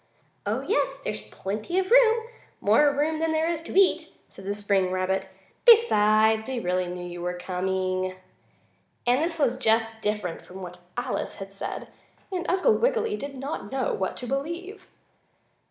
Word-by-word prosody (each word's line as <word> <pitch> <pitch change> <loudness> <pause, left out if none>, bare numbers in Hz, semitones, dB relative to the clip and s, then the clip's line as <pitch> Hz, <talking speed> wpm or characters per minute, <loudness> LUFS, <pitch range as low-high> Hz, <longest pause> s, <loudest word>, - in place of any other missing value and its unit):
"Oh, - - 0
yes, - - 0
there's 105 - -2
plenty 205 - -4
of 380 +2 0
room 465 -2 +5 0.3
more 285 +8 +4
room 300 +3 0
than 325 0 +1
there 315 +1 +1
is 335 -1 -1
to 350 +3 +1
eat," 390 - +3 0.2
said 195 - -13
the 200 +1 -2
spring 200 -2 +1
rabbit. 185 +1 -1 0.3
"Besides, 220 - +5
we 260 -2 -2
really 180 -2 0
knew 175 0 -5
you 175 0 -7
were 180 0 -2
coming." 185 0 -2 0.9
As 245 +2 +3
this 330 +2 -1
was 260 -5 +1
just 225 -2 +1
different 210 -5 -2
from 185 +1 -11
what 180 0 -9 0.2
Alice 245 +1 -2
had 195 -1 -8
said, 195 - -5 0.6
Uncle 385 +6 +3
Wiggily 455 -3 +1
did 280 -4 -6
not 270 -5 -5
know 265 -1 0
what 190 - -2
to 250 - -5
believe. 340 - -4
225 Hz, 160 wpm, -26 LUFS, -, 0.9 s, room